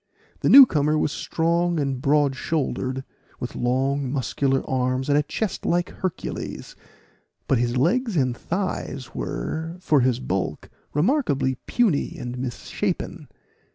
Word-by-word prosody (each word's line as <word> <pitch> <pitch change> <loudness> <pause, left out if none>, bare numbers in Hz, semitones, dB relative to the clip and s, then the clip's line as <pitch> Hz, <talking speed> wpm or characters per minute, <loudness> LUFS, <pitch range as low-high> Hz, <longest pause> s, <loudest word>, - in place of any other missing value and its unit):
The - - +1
new 275 -1 +11
comer 150 - +1
was 150 - +1
strong 170 +1 0
and 135 -3 -1
broad 145 -1 +3
shouldered, 135 -3 -2 0.4
with 125 - -5
long 130 +2 0
muscular 135 0 0
arms, 130 +1 0
and 145 - +4
a 150 - +5
chest 200 +6 -3
like 175 +1 0
Hercules; 185 -2 -5 0.7
but 130 - +3
his 120 +1 0
legs 210 - +1
and 130 -4 +1
thighs 165 -7 -4
were, 160 - -4
for 155 -5 +3
his 125 -1 +2
bulk, 90 -8 -3 0.2
remarkably 150 - +2
puny 215 -12 +1
and 125 0 -5
misshapen. 125 -2 -3
140 Hz, 130 wpm, -24 LUFS, 130-170 Hz, 0.7 s, new